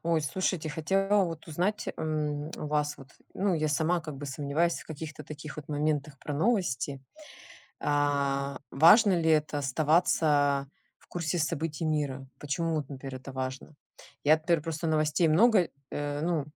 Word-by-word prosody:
Ой, 165 Hz, -2 st, +1 dB
слушайте, 165 Hz, +1 st, -1 dB
хотела 195 Hz, +6 st, +2 dB
вот 165 Hz, -2 st, -6 dB
узнать, 180 Hz, +7 st, -1 dB
м, 150 Hz, -2 st, -2 dB
у -, -, -5 dB
вас, 150 Hz, 0 st, 0 dB
вот, 135 Hz, -2 st, -13 dB, 0.3 s
ну, 195 Hz, 0 st, +1 dB
я 155 Hz, -1 st, 0 dB
сама 160 Hz, +4 st, +1 dB
как 155 Hz, -3 st, -7 dB
бы 140 Hz, -, -7 dB
сомневаюсь 145 Hz, +5 st, 0 dB
в -, -, -14 dB
каких-то 155 Hz, -1 st, -7 dB
таких 150 Hz, +1 st, -9 dB
вот 150 Hz, -2 st, -8 dB
моментах 150 Hz, -1 st, -1 dB
про 150 Hz, -, -5 dB
новости. 155 Hz, -, 0 dB, 0.8 s
А, 140 Hz, -1 st, 0 dB
важно 180 Hz, -, +6 dB
ли 160 Hz, -, +1 dB
это- 155 Hz, -1 st, +2 dB
оставаться 145 Hz, -1 st, +2 dB, 0.3 s
в -, -, -25 dB
курсе 170 Hz, -1 st, -2 dB
событий 160 Hz, 0 st, -2 dB
мира? 140 Hz, -4 st, -1 dB
Почему, 160 Hz, +3 st, -1 dB
вот, 150 Hz, -3 st, -2 dB
например, 135 Hz, -1 st, -7 dB
это 130 Hz, +1 st, -9 dB
важно? 130 Hz, +3 st, -5 dB, 0.5 s
Я 155 Hz, +2 st, +6 dB
теперь 165 Hz, -1 st, +1 dB
просто 165 Hz, +1 st, -3 dB
новостей 155 Hz, +1 st, +2 dB
много, 190 Hz, +2 st, +5 dB, 0.2 s
э 145 Hz, 0 st, -3 dB
ну, 165 Hz, -3 st, 0 dB
155 Hz, 155 wpm, -29 LUFS, 145-165 Hz, 0.8 s, важно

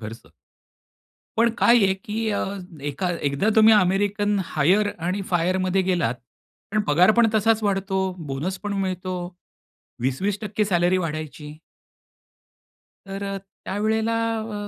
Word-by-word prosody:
खर्च. 115 Hz, +1 st, -9 dB, 1.1 s
पण 235 Hz, +1 st, +4 dB
काय 235 Hz, -, +5 dB
आहे 190 Hz, -1 st, +3 dB
की 215 Hz, +3 st, -4 dB
अ, 200 Hz, -, -1 dB, 0.4 s
एका 145 Hz, +6 st, -2 dB, 0.2 s
एकदा 140 Hz, +10 st, 0 dB
तुम्ही 220 Hz, 0 st, +7 dB
अमेरिकन 205 Hz, +1 st, +2 dB
हायर 185 Hz, +9 st, +2 dB, 0.2 s
आणि 190 Hz, +3 st, -1 dB
फायरमध्ये 185 Hz, +2 st, +1 dB
गेलात, 175 Hz, -10 st, 0 dB, 0.6 s
पण 215 Hz, +1 st, +2 dB
पगार 175 Hz, +7 st, +5 dB
पण 235 Hz, -1 st, +6 dB
तसाच 220 Hz, +1 st, +3 dB
वाढतो, 195 Hz, -1 st, 0 dB, 0.3 s
बोनस 150 Hz, +8 st, -3 dB
पण 205 Hz, -1 st, -2 dB
मिळतो. 185 Hz, -1 st, -3 dB, 0.8 s
20%-20% 200 Hz, -, -1 dB
सॅलरी 180 Hz, -1 st, +2 dB
वाढायची. 155 Hz, -3 st, -5 dB, 1.5 s
तर 195 Hz, +1 st, -6 dB
अ, 195 Hz, 0 st, -3 dB
त्यावेळेला 215 Hz, +3 st, -2 dB, 0.3 s
अ, 210 Hz, -2 st, -5 dB
195 Hz, 120 wpm, -23 LUFS, 175-210 Hz, 1.5 s, तुम्ही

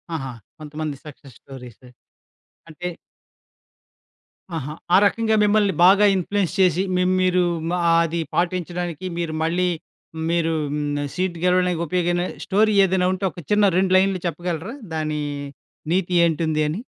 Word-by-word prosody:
ఆహా! 135 Hz, -4 st, -4 dB, 0.3 s
కొంతమంది 155 Hz, -1 st, -5 dB
success 140 Hz, -4 st, -13 dB
stories. 125 Hz, -3 st, -12 dB, 0.9 s
అంటే 175 Hz, +3 st, -6 dB, 1.7 s
ఆహా! 150 Hz, 0 st, -5 dB, 0.2 s
ఆ -, -, +8 dB
రకంగా 220 Hz, +1 st, +1 dB
మిమ్మల్ని 205 Hz, -1 st, +3 dB
బాగా 200 Hz, +3 st, +6 dB
ఇన్‌ఫ్లూయెన్స్ 190 Hz, 0 st, -1 dB
చేసి 185 Hz, -1 st, +3 dB
మె 180 Hz, -, +2 dB, 0.2 s
మీరు 185 Hz, -1 st, +3 dB, 0.3 s
మా 180 Hz, -, 0 dB, 0.3 s
అది 170 Hz, +1 st, -3 dB, 0.2 s
పాటించడానికి 175 Hz, -1 st, -2 dB
మీరు 170 Hz, -2 st, -2 dB
మళ్ళీ 175 Hz, +3 st, +1 dB, 0.6 s
మీరు 165 Hz, -1 st, +1 dB, 0.2 s
హ్మ్, 145 Hz, -1 st, -2 dB
సీట్ 185 Hz, -1 st, -2 dB
గెలవడానికి 180 Hz, -1 st, +2 dB
ఉపయోగమైన 175 Hz, +1 st, 0 dB, 0.2 s
స్టోరీ 215 Hz, +2 st, +2 dB
ఏదైనా 185 Hz, -1 st, +1 dB
ఉంటే, 185 Hz, +1 st, -6 dB
ఒక 180 Hz, -, -11 dB
చిన్న 210 Hz, 0 st, +4 dB
2 185 Hz, 0 st, +2 dB
లైన్‌లు 190 Hz, 0 st, +2 dB
చెప్పగలరా? 175 Hz, +4 st, -4 dB, 0.2 s
దాని 155 Hz, -1 st, -2 dB, 0.7 s
నీతి 180 Hz, 0 st, 0 dB
ఏంటుంది 160 Hz, -1 st, +1 dB
అని. 160 Hz, +8 st, -3 dB
175 Hz, 125 wpm, -22 LUFS, 155-185 Hz, 1.7 s, ఆ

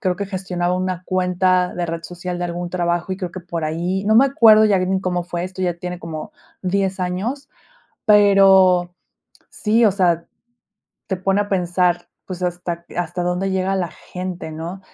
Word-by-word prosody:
creo 185 Hz, -5 st, 0 dB
que 200 Hz, -, -3 dB
gestionaba 180 Hz, -2 st, -2 dB
una 185 Hz, -1 st, -2 dB
cuenta 180 Hz, 0 st, +1 dB
de 175 Hz, -1 st, -2 dB
red 165 Hz, 0 st, -4 dB
social 180 Hz, +1 st, -6 dB
de 175 Hz, -, -2 dB
algún 175 Hz, 0 st, -4 dB
trabajo, 175 Hz, 0 st, -1 dB
y -, -, -3 dB
creo 185 Hz, -2 st, -5 dB
que 185 Hz, -, -8 dB
por 170 Hz, -2 st, -4 dB
ahí, 175 Hz, +5 st, -2 dB
no 215 Hz, +1 st, +3 dB
me 265 Hz, +4 st, +7 dB
acuerdo 220 Hz, -5 st, +6 dB
ya 200 Hz, -2 st, +3 dB
ni 190 Hz, +1 st, 0 dB
cómo 180 Hz, -2 st, -1 dB
fue. 175 Hz, 0 st, -4 dB
Esto 185 Hz, 0 st, -6 dB
ya 175 Hz, -2 st, 0 dB
tiene 180 Hz, 0 st, -5 dB
como 160 Hz, -2 st, -7 dB, 0.3 s
10 190 Hz, +1 st, 0 dB
años, 205 Hz, +11 st, -3 dB, 0.6 s
pero 195 Hz, -4 st, +5 dB, 0.6 s
sí, 225 Hz, +2 st, +2 dB
o 210 Hz, -, +5 dB
sea, 175 Hz, -3 st, +1 dB, 0.8 s
te 190 Hz, -, -2 dB
pone 195 Hz, +2 st, +1 dB
a 205 Hz, -, -9 dB
pensar, 180 Hz, -2 st, 0 dB, 0.2 s
pues, 185 Hz, -1 st, -6 dB
hasta 175 Hz, -1 st, -3 dB
q -, -, -15 dB
hasta 175 Hz, +1 st, -2 dB
dónde 180 Hz, +2 st, -1 dB
llega 190 Hz, 0 st, 0 dB
la 180 Hz, -2 st, -1 dB
gente, 180 Hz, -2 st, -7 dB
¿no? 165 Hz, +4 st, -6 dB
180 Hz, 185 wpm, -20 LUFS, 175-190 Hz, 0.8 s, me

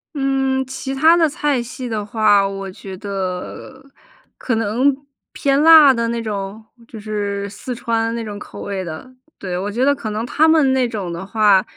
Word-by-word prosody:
嗯， 270 Hz, -1 st, 0 dB
其 265 Hz, +1 st, -5 dB
它 315 Hz, +5 st, +5 dB
的 330 Hz, -2 st, +3 dB
菜 290 Hz, -4 st, 0 dB
系 250 Hz, +2 st, -7 dB
的 220 Hz, -2 st, -3 dB
话， 205 Hz, -1 st, +3 dB
我 195 Hz, 0 st, -6 dB
觉 190 Hz, 0 st, -9 dB
得， 195 Hz, +6 st, -6 dB, 0.5 s
可 240 Hz, -, -1 dB
能 230 Hz, +6 st, +1 dB, 0.4 s
偏 275 Hz, 0 st, +1 dB
辣 310 Hz, -3 st, +8 dB
的 230 Hz, -1 st, -1 dB
那 235 Hz, 0 st, -2 dB
种？ 210 Hz, 0 st, -5 dB, 0.2 s
就 225 Hz, -, -10 dB
是 205 Hz, -1 st, -3 dB
四 225 Hz, +5 st, -7 dB
川 230 Hz, -1 st, -1 dB
那 230 Hz, -, -4 dB
种 205 Hz, -2 st, -7 dB
口 -, -, -10 dB
味 195 Hz, -2 st, -4 dB
的。 170 Hz, +9 st, -8 dB, 0.2 s
对， 185 Hz, -2 st, -5 dB
我 200 Hz, +3 st, -3 dB
觉 245 Hz, +5 st, 0 dB
得 285 Hz, -, +4 dB
可 230 Hz, -5 st, -6 dB
能 215 Hz, +2 st, -3 dB
它 305 Hz, +6 st, +2 dB
们 310 Hz, -5 st, +4 dB
那 255 Hz, -2 st, +2 dB
种 200 Hz, -7 st, -4 dB
的 170 Hz, +2 st, -6 dB
话， 205 Hz, -2 st, +3 dB
225 Hz, 200 characters per minute, -19 LUFS, 200-265 Hz, 0.5 s, 辣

